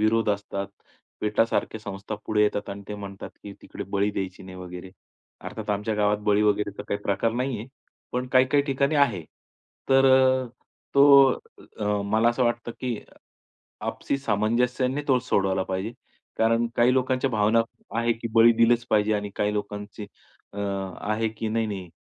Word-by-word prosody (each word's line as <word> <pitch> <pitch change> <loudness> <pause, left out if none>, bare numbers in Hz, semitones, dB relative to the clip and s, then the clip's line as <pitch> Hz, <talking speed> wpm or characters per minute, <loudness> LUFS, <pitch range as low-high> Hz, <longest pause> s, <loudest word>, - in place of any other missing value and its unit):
विरोध 110 +1 +2
असतात. 100 -1 -3 0.5
पेटासारख्या 110 +1 0
संस्थापुढे 105 +1 -2
येतात 105 -1 0
आणि 100 0 -7
ते 105 - -4
म्हणतात 100 -1 -8
की, 100 - -8
तिकडे - - -7
बळी 100 +1 +1
द्यायची 95 -2 -5
नाही 95 0 -10
वगैरे. 90 0 -8 0.5
अर्थात - - -6
आमच्या 105 +2 -1
गावात 105 0 +2
बळी 105 0 +4
वगैरेचा 105 -1 0
काही 100 - -2
प्रकार 100 +3 0
नाहीये. 120 -2 -2 0.5
पण 125 +1 -2
काही-काही 130 +2 +4
ठिकाणी 140 +1 0
आहे. 120 - +2 0.6
तर 135 0 +5
अ, 130 -1 +4 0.5
तो 140 -1 +8 0.5
अ, 105 0 0
मला 110 +3 +3
असं 120 +2 +1
वाटतं 120 0 -1
की 125 -2 -1
अ, - - -16 0.7
आपसी - - -2
सामंजस्याने 125 +4 0
तो 130 -2 +5
सोडवायला 95 -6 0
पाहिजे. 95 +5 -3 0.5
कारण 115 +1 +3
काही 120 +2 +4
लोकांच्या 130 0 +1
भावना 110 +1 +3 0.4
आहे 115 0 +2
की, 115 +1 -6
बळी 115 +1 +7
दिलेच 115 +1 +3
पाहिजे 105 0 +3
आणि 105 -1 -3
काही 105 0 +1
लोकांचे 105 0 -5 0.5
अ, 100 - -9
आहे 100 +3 -2
की 110 0 -5
नाही, 115 +1 0
नाही 95 -4 -5
110 Hz, 155 wpm, -25 LUFS, 100-120 Hz, 0.7 s, तो